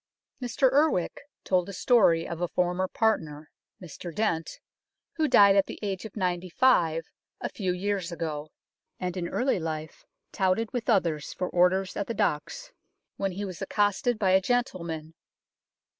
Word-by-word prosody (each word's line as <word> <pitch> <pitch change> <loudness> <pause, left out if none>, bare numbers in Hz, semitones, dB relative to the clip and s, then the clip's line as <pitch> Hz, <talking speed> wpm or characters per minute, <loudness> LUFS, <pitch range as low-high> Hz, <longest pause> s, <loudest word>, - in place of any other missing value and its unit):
Mr 250 +1 +2
Urwick 285 - +2 0.2
told 180 0 +1
a - - -6
story 180 -6 +3
of 170 0 -6
a 175 - +1
former 180 +2 0
partner, 160 -9 -1 0.3
Mr 175 0 -8
Dent, 165 -4 -2 0.6
who 315 -1 +2
died 200 -7 +7
at 195 - +3
the - - -7
age 195 -1 -3
of 220 - -9
ninety 180 -1 -1
five 165 -8 +3 0.3
a - - -3
few 190 -4 -2
years 185 -1 -2
ago, 155 -2 -4 0.5
and 180 0 -3
in 175 -2 -3
early 255 -6 +1
life 155 -1 -5 0.3
touted 195 +3 0
with 245 -1 -3
others 165 -9 +1
for 180 - -3
orders 185 +2 +2
at 200 - -3
the 230 - -3
docks, - - -2 0.5
when 195 -1 -1
he 200 +3 -4
was 185 -4 -7
accosted 205 +4 +1
by 195 -3 +2
a 190 +1 +5
gentleman. 170 -9 -2
185 Hz, 160 wpm, -27 LUFS, 170-210 Hz, 0.6 s, died